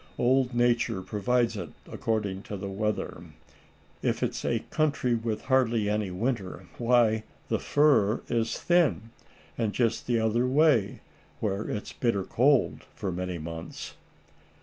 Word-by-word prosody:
Old 130 0 +2
Nature 120 -5 +2
provides 115 +4 0
it 90 -5 -5 0.2
according 105 -4 -2
to 105 - -3
the 100 +1 -5
weather. 105 +1 -2 0.8
If - - 0
it's - - -2
a - - -1
country 150 -5 +1
with 115 -2 -2
hardly 120 -5 +2
any 105 -2 0
winter, 100 0 -3
why 115 -2 +3 0.3
the - - +1
fur 140 -8 +3
is 115 -2 0
thin; 165 -10 +2 0.5
and 110 -3 0
just 115 -2 0
the 120 -2 +2
other 115 +3 +1
way 135 -6 +3 0.4
where 105 -1 -2
it's 105 - -4
bitter 115 -6 0
cold 135 +6 +2
for 100 -4 -3
many 90 0 -3
months." 80 +1 -7
115 Hz, 135 wpm, -28 LUFS, 100-125 Hz, 0.8 s, why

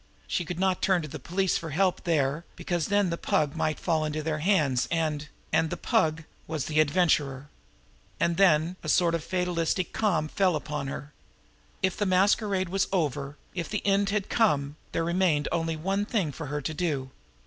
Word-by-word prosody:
She 175 - -1
could 175 +1 -5
not 190 -1 +1
turn 185 -3 +2
to - - -5
the 155 +1 -7
police 180 +6 0
for 165 - -6
help 185 +5 +1
there, 150 -2 +1
because 175 -2 -2
then 205 -3 +2
the 170 - -3
Pug 145 -2 +1
might 155 -1 -1
fall 160 -3 +1
into 155 0 -2
their 155 -1 -1
hands, 150 -8 +2
and 155 -3 -1 0.3
and 160 - +3
the - - -4
Pug 160 0 +1 0.2
was 155 -3 -2
was - - -6
the 155 0 0
Adventurer. 145 -4 +2 0.7
And 170 0 +2
then 175 -2 +4
a - - -5
sort 170 -2 +3
of 165 -2 -1
fatalistic 180 -1 -1
calm 175 -8 +1
fell 185 +1 +2
upon 150 -2 -3
her. 140 +2 -6 0.7
If 190 -1 +1
the 205 - 0
masquerade 190 0 +2
was 195 +1 +1
over, 145 -5 -1 0.2
if 175 -3 -4
the 210 - -3
end 200 0 +3
had 205 -1 -1
come, 145 -11 +1 0.2
there 165 - 0
remained 170 -3 +2
only 165 -1 0
one 195 +6 -1
thing 195 -11 0
for 160 +2 -7
her 145 +1 -3
to 155 - -2
do. 145 -6 -2
165 Hz, 190 wpm, -27 LUFS, 150-185 Hz, 0.7 s, then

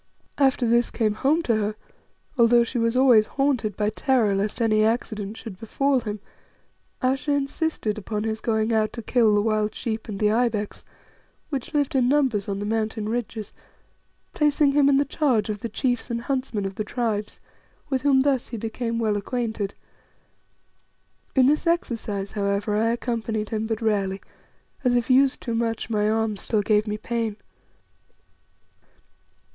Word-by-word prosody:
After 270 -3 +3
this 235 +1 +3
came 215 -3 0
home 290 +9 +1
to 235 - +2
her 210 0 -1 0.6
although 235 -1 +5
she 240 +1 -3
was 230 +2 +1
always 240 -5 +6
haunted 265 -7 0
by 210 0 +1
terror 235 -3 +2
lest 200 +4 -1
any 215 -2 +3
accident 215 -2 -1
should 205 -5 -9
befall 275 +4 +1
him 210 -3 -5 0.8
Ayesha 270 +3 +1
insisted 275 -6 -1
upon 210 +1 -3
his 220 0 -3
going 220 0 0
out 215 -1 +1
to 230 - -6
kill 225 -2 +3
the 205 - +2
wild 215 -1 0
sheep 220 -2 -3
and 205 -3 -5
the 210 -1 +3
ibex, 220 -3 -1 0.7
which 275 -1 -4
lived 290 +1 +1
in 250 -2 +3
numbers 260 -9 +1
on 195 - -2
the 205 - -4
mountain 220 0 -2
ridges, 225 -2 -4 0.8
placing 295 -2 +3
him 280 0 +4
in 275 - +4
the 285 - +2
charge 250 -9 +1
of 210 - -5
the 230 - -4
chiefs 245 +2 -1
and 235 -1 -2
huntsmen 255 -5 -2
of 195 - -3
the 215 - -3
Tribes, 215 -2 -3 0.5
with 265 -1 +1
whom 270 -1 +4
thus 270 -3 +1
he 235 - -6
became 230 +2 -3
well 220 -2 +1
acquainted. 220 -1 -3 1.6
In 260 -2 +5
this 300 +5 +2
exercise, 225 - -1
however, 200 0 -1
I 220 +2 +2
accompanied 230 -2 -2
him 220 0 -2
but 225 0 -3
rarely, 200 -3 0 0.6
as, 250 -2 +3
if 240 +1 +1
used 265 +1 +4
too 235 - -3
much, 230 0 -2
my 210 -1 +2
arm 220 -1 0
still 210 +1 -1
gave 210 +1 +2
me 210 0 -2
pain. 225 -1 -3
225 Hz, 165 wpm, -24 LUFS, 210-255 Hz, 1.6 s, always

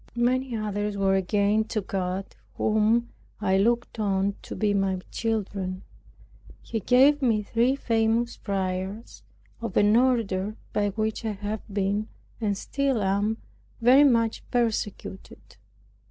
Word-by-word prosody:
Many 250 +1 +1
others 205 -1 -2
were 195 -1 +2
gained 205 +3 +1
to 215 - -1
God, 190 0 -3 0.2
whom 220 +2 +2 0.3
I 190 -2 +2
looked 235 +2 0
on 200 -1 +1
to - - -8
be 210 -2 +1
my 195 -2 0
children. 195 -4 -2 0.8
He 225 - -3
gave 265 +7 +4
me 225 -5 +2
three 235 +5 +1
famous 230 -2 +1
friars, 190 +2 -4 0.4
of 230 -4 -3
an 205 +1 +5
order 215 -5 +1 0.2
by 205 -1 +1
which 215 +2 -2
I 220 -2 -1
have 205 +2 -4
been, 200 +2 0 0.3
and 205 -3 -1
still 270 -1 -1
am, 200 +3 +1 0.4
very 255 +5 +6
much 230 -5 +2
persecuted. 215 - -3
215 Hz, 125 wpm, -26 LUFS, 195-230 Hz, 0.8 s, very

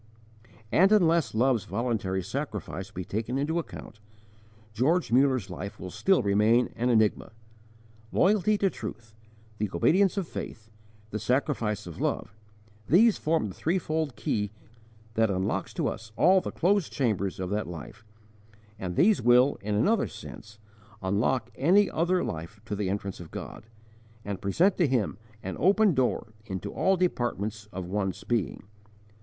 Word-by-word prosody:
* - - -33 0.3
And 190 +4 +5
unless 170 - +3
Love's 120 -2 +2
voluntary 100 -3 -1
sacrifice 100 - -5
be 90 -1 -6
taken 115 +7 -2
into 155 +5 0
account, 110 -8 -9 0.7
George 135 +4 +1
Muller's 130 -6 +3
life 100 +4 -7
will 90 - -7
still 190 - +2
remain 105 +4 +3
an 120 +2 0
enigma. 110 -2 +2 0.8
Loyalty 210 +2 +3
to 195 -2 +1
truth, 110 0 -8 0.5
the 105 -1 0
obedience 185 - +3
of 190 -4 -1
faith, 110 -1 -7 0.4
the 110 - -3
sacrifice 120 -5 0
of 85 -3 -8
love 100 - -2 0.5
these 215 +6 +5
form 155 -9 0
the - - -8
threefold 160 - -1
key 105 -1 -1 0.6
that 110 0 +2
unlocks 95 0 -1
to - - 0
us 110 +1 -5
all 185 +7 +5
the - - -4
closed 195 +1 +1
chambers 105 - -1
of 95 0 -3
that 105 +1 -1
life, 100 +6 -9 0.8
and 90 -2 -4
these 210 - +4
will, 125 +3 +4
in 105 0 -2
another 215 - +2
sense, 105 -1 -11 0.5
unlock 110 +5 0
any 185 - +3
other 180 +2 +1
life 85 +6 -6
to 105 - -3
the 100 -2 -2
entrance 100 0 -3
of 85 -2 -9
God, 110 - -8 0.6
and 100 -2 -4
present 175 - +2
to 175 - +3
Him 115 -7 0 0.2
an 95 - -5
open 200 +1 +4
door 125 -4 0
into 95 -2 -5
all 190 0 +2
departments 110 - -1
of 95 -1 -5
one's 95 +1 -2
being. 115 -9 -1
115 Hz, 150 wpm, -28 LUFS, 100-160 Hz, 0.8 s, And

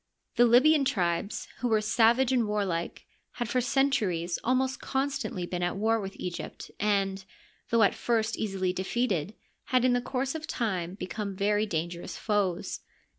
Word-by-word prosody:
The 240 - +6
Libyan 275 +5 +6
tribes, 180 -5 -1
who 250 - 0
were 220 -2 +3
savage 230 +4 +3
and 245 -4 +2
warlike, 195 -5 -2 0.3
had 240 - -3
for 250 +2 +1
centuries 210 -11 +1
almost 260 +2 +1
constantly 265 -9 -2
been 180 0 -4
at 175 +1 -1
war 225 +2 +2
with 195 0 -6
Egypt, 180 -1 -6
and, 195 -2 +1 0.5
though 230 -1 +4
at 200 - +4
first 225 -1 0
easily 190 -3 -1
defeated, 190 -1 -1 0.3
had 255 -1 +2
in 255 - +4
the 245 - +2
course 260 +1 -2
of 320 0 -6
time 185 -6 -2
become 200 +1 -5
very 210 +2 +1
dangerous 170 -1 -4
foes. 200 -5 -1
210 Hz, 155 wpm, -28 LUFS, 185-245 Hz, 0.5 s, The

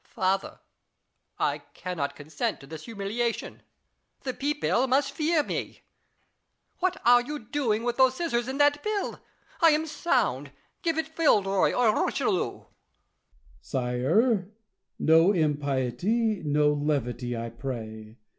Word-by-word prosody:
Louis. - - -30
Father, 190 -2 0 0.8
I - - +1 0.2
cannot 175 -6 -3
consent 145 0 -3
to 135 - -13
this 155 +2 -9
humiliation: 225 +2 -3 0.6
the 255 - -3
people 280 -2 0
must 275 +2 +2
fear 310 0 +1
me. - - -5 1.0
What 370 0 0
are 245 0 +7
you 295 +5 -5
doing 230 -3 -1
with 240 0 -1
those 260 -1 +5
scissors 245 -7 -1
and 265 +2 -4
that 290 0 +4
pill 425 -2 -1
1 - - -14 0.4
I 330 - +8
am 310 +1 +1
sound; 245 - 0 0.3
give 330 -2 0
it 320 0 -3
Villeroy 200 - +3
or 230 -4 +3
Richelieu. - - 0
La - - 0
Chaise. - - -16 1.0
Sire, 145 - +1 0.5
no 165 +5 +5
impiety, 150 - 0
no 150 0 +3
levity, 125 -5 -2
I 115 0 -5
pray. 110 -3 -7
210 Hz, 135 wpm, -27 LUFS, -, 1.0 s, I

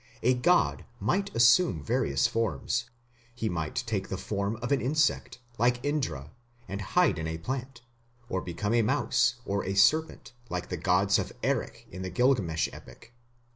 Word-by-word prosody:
A 125 +2 +4
god 175 +9 +2 0.2
might 200 +2 0
assume 115 - +4
various 70 0 +1
forms; 115 +1 -1 0.5
he 115 -2 -2
might 80 -3 -3
take - - -2
the - - -3
form 100 +1 -2
of 120 +4 -5
an 140 - +2
insect, 150 +3 0 0.2
like 120 +1 +3
Indra, 130 - -2 0.4
and 100 +1 -5
hide 85 - +2
in 80 - -3
a 80 0 -3
plant, 130 +7 -5 0.5
or 95 -4 -2
become 105 +5 -3
a 120 - +4
mouse, 120 +2 +2
or 100 0 -1
a 95 - -3
serpent, 140 +8 +2 0.2
like 90 0 -4
the 90 - -2
gods 95 +4 +2
of - - -3
Erech - - -2
in 90 - -7
the 95 - -4
Gilgamesh 105 - +1
epic. 120 - -14
115 Hz, 165 wpm, -28 LUFS, 90-125 Hz, 0.5 s, A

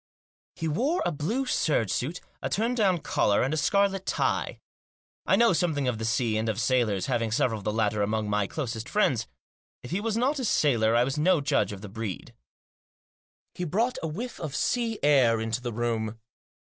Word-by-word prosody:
He 165 - -3
wore 265 - 0
a - - +1
blue 210 - -2
serge 145 - +1
suit, 155 +8 -2 0.2
a - - -2
turn 230 +4 0
down 195 -8 +2
collar, 100 -6 +2
and 135 +4 0
a - - +1
scarlet 195 +4 +1
tie. - - -1 0.7
I - - +5
know 235 -4 +4
something 155 -5 0
of 120 -3 -1
the 110 - -3
sea 115 -1 +1
and 110 +1 -1
of 110 0 -2
sailors, 115 -6 +1
having 115 -2 -1
several 110 0 +1
of - - -12
the 105 - +1
latter 105 -1 0
among 105 +1 0
my 105 -1 0
closest 120 -5 -4
friends. 130 - +1 0.6
If 125 - -9
he 185 +4 -1
was 225 0 -1
not 270 +5 +1
a - - -2
sailor 115 - +2
I 120 - +5
was 135 +4 -2
no 175 +2 +4
judge 140 -5 +1
of 100 -1 -8
the 105 - -7
breed. 110 -2 -6 1.2
He 180 - -5
brought 225 - 0
a 160 - -2
whiff 225 +11 -6
of 155 -4 -5
sea 235 -3 0
air 130 -6 +4
into 110 +1 -2
the 120 -1 -4
room. 115 -1 -2
135 Hz, 195 wpm, -27 LUFS, 110-185 Hz, 1.2 s, I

